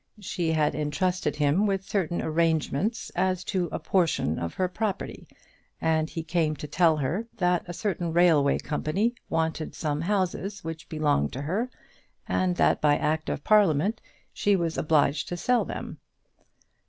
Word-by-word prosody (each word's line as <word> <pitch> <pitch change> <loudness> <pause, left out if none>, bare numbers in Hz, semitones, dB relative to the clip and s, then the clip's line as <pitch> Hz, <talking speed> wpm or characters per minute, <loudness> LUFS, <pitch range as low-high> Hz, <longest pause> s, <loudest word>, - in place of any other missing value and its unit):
She 175 -5 -1
had 155 -2 +2
entrusted 165 +5 -1
him 150 +8 +2
with 195 -1 0
certain 180 -5 -1
arrangements 165 - 0
as 185 0 0
to 180 -4 -1
a - - -2
portion 165 - +1
of 85 0 -4
her 185 - +1
property, 200 +2 -4 0.5
and 160 -1 +1
he 165 - -5
came 160 -2 0
to 150 - -7
tell 160 +2 +3
her 165 - -2
that 180 -1 +2
a 175 - -5
certain 175 -3 -2
railway 160 -5 +4
company 190 +10 -1 0.2
wanted 160 -1 -1
some 150 -1 -2
houses 195 +2 -1
which 160 -1 -7
belonged 145 - +1
to 135 - -4
her, 205 +12 -1 0.6
and 185 -1 +1
that - - +3
by 145 -1 +4
Act 155 +1 -1
of 145 - -3
Parliament 205 -2 +3 0.3
she 205 -1 +2
was 170 -3 -1
obliged 150 -2 +2
to 175 - -4
sell 245 +8 +2
them. - - -6
165 Hz, 155 wpm, -27 LUFS, 155-185 Hz, 0.6 s, railway